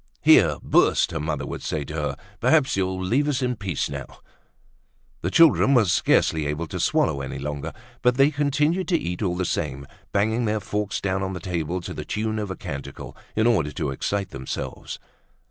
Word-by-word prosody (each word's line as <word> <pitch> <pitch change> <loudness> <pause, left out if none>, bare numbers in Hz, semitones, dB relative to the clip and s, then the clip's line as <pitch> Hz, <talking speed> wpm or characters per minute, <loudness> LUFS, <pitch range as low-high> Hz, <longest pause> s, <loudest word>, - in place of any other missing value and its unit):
"Here! - - +6
Burst!" - - +3
her 80 - -3
mother 75 -2 -2
would - - -6
say 75 - -2
to 75 - -8
her. 75 -3 -2 0.2
"Perhaps 135 +2 +3
you'll 95 -1 -1
leave 120 +11 +1
us 135 -3 0
in 125 0 0
peace 95 -8 -2
now!" - - -6 1.1
The 90 - -1
children 145 +1 +5
were 120 -3 +5
scarcely 80 -3 +2
able 75 +3 -2
to - - -4
swallow 70 - +1
any 65 0 -5
longer, 75 +2 -4 0.3
but 125 0 +3
they 135 +3 +5
continued 150 +5 +1
to 175 - +3
eat 90 +3 -4
all 90 -4 0
the 90 0 -1
same, 70 -5 -2 0.3
banging 110 +4 +1
their 110 0 0
forks 105 +1 -3
down 95 -1 -1
on 95 0 -2
the 90 - -5
table 90 -1 -3
to - - -6
the - - -5
tune 110 0 -2
of 105 -2 -3
a 95 - -4
canticle, 70 -5 -7 0.2
in 110 - +2
order 85 -12 +2
to 70 -1 -2
excite 100 +8 -2
themselves. 65 -2 -5
95 Hz, 195 wpm, -24 LUFS, 75-115 Hz, 1.1 s, Here